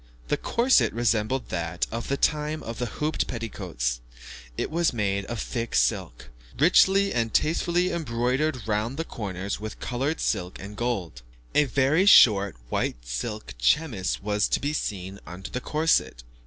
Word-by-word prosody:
The - - +2
corset 245 +3 +3
resembled 115 +2 0
that 85 0 -2
of 115 +1 -4
the 140 - 0
time 150 +1 0
of 115 0 -6
the 125 - -1
hooped 150 +8 -2
petticoats; 85 - -3 0.6
it - - -2
was 170 -2 +1
made 100 -3 -1
of 120 +1 -5
thick 115 +1 -3
silk, - - 0 0.3
richly 190 +6 +4
and 115 -2 0
tastefully 170 +5 +1
embroidered 130 -2 -1
round 110 +5 -1
the 165 - -1
corners 100 - -4
with 110 0 -7
coloured 135 +6 -2
silk 90 0 -1
and 100 +2 -8
gold. 95 - -3 0.3
A 150 - +4
very 140 - +2
short 100 - +7
white - - -2
silk 105 - -4
chemise 105 - +1
was 105 0 +1
to - - +1
be 145 +2 -2
seen 95 -7 -4
under 90 +3 -8
the 125 - -3
corset. 155 - +1
115 Hz, 155 wpm, -26 LUFS, 100-150 Hz, 0.6 s, short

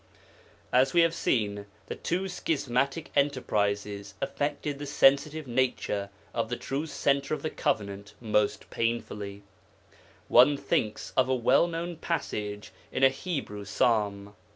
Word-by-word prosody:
As 130 +2 +4
we 170 - +7
have 165 -1 +3
seen, 105 -10 0 0.2
the - - -5
two 185 +3 -2
schismatic 140 -4 -1
enterprises 105 -7 0
affected 145 +1 -2
the 145 - -5
sensitive 145 +2 +3
nature 120 -5 -1 0.2
of 115 -1 -1
the 120 - -2
true 140 +4 -3
Centre 140 0 +1
of - - -10
the 155 - -2
Covenant 100 -1 -2
most 105 -2 0
painfully; 105 -3 -3 0.8
one 135 +4 +6
thinks 110 -5 -1
of 130 -1 +3
a 130 - +3
well 130 +7 +4
known 170 0 -4
passage 105 -12 -3 0.2
in 130 - -1
a 135 - +9
Hebrew 135 - -4
psalm. 100 -1 0
130 Hz, 130 wpm, -28 LUFS, 105-145 Hz, 0.8 s, a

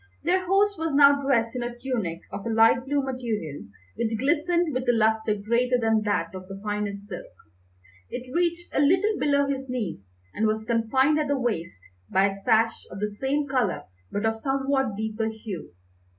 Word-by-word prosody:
Their 365 +3 +1
host 400 0 +3
was 325 -3 -1
now 280 0 +6
dressed 235 -4 +1
in 250 - -2
a 240 0 -4
tunic 225 -10 -3
of 200 - -6
a - - -1
light 225 +2 +4
blue 285 0 0
material, 225 - -4 0.3
which 225 -1 -1
glistened 325 - +1
with 255 - 0
a - - +8
lustre 220 -1 +2
greater 235 +5 +1
than 225 -1 +2
that 180 -5 0
of 185 0 -8
the 195 0 -8
finest 205 -1 -3
silk. 185 -4 -7 0.8
It 250 0 -7
reached 345 0 -1
a - - +1
little 375 +9 +3
below 285 -1 +3
his 270 -1 -3
knees, 210 - -4 0.2
and 220 - +1
was 220 0 -1
confined 260 +6 +2
at 300 - 0
the 285 0 +1
waist 170 - -3 0.3
by 195 +1 +4
a 195 0 -8
sash 225 +3 +2
of 190 - -8
the 210 +1 -1
same 285 +2 0
colour 255 -8 0 0.3
but 205 - -2
of 225 0 0
somewhat 270 -3 0
deeper 220 0 -2
hue. 220 -5 -7
235 Hz, 185 wpm, -26 LUFS, 215-280 Hz, 0.8 s, a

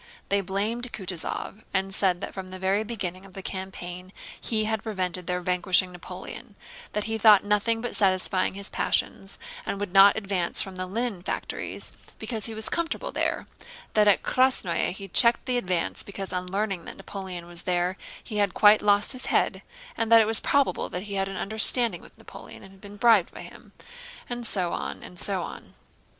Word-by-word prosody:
They 200 0 +2
blamed 215 +6 -2
Kutúzov 190 +2 -4
and 190 0 0
said 185 -2 +1
that - - -5
from 190 -1 -6
the 185 0 -7
very 190 +3 +1
beginning 190 -5 -5
of 195 -1 -15
the 195 - -7
campaign 185 -1 -6 0.3
he 220 -2 0
had 220 -1 -1
prevented 185 -5 -3
their 180 0 -1
vanquishing 180 +1 +3
Napoleon, 180 -1 -9 0.4
that 210 - -1
he 220 +1 -2
thought 210 -2 +8
of - - -17
nothing 215 +2 +2
but 240 - -3
satisfying 185 -1 +2
his 200 0 -5
passions - - -1 0.3
and 200 - -3
would 200 -3 -4
not 195 +1 +8
advance 195 -5 -1
from 190 -1 -2
the 185 0 -4
Linen 220 -1 -2
Factories - - -4 0.3
because 220 -4 -3
he 225 - -6
was 220 0 -3
comfortable 340 +9 -2
there, - - -1 0.5
that 210 -1 +4
at 205 - +4
Krásnoe 255 -9 +2
he 195 +2 -7
checked 235 +7 +4
the 250 -1 +1
advance 180 -6 -1
because 195 -1 -5
on 180 0 -2
learning 195 -3 -1
that - - -8
Napoleon 190 -3 -7
was 175 0 -6
there 180 0 0 0.3
he 215 - -5
had 200 -3 +1
quite 210 0 +7
lost 205 0 +3
his 255 -1 -2
head, - - +1 0.3
and 225 0 -1
that 230 - +10
it 220 - +5
was 220 +1 +5
probable 280 -1 +1
that 180 - -4
he 205 -1 -6
had 195 -1 0
an 195 - -6
understanding 220 -1 0
with - - -17
Napoleon - - -12
and 195 - -13
had 195 0 -19
been 205 0 -11
bribed 220 -5 +5
by - - -7
him, - - -13 0.6
and 240 -1 -4
so 180 -5 0
on, - - -4
and 180 - -10
so 190 -3 -1
on. - - -9
195 Hz, 195 wpm, -26 LUFS, 185-220 Hz, 0.6 s, that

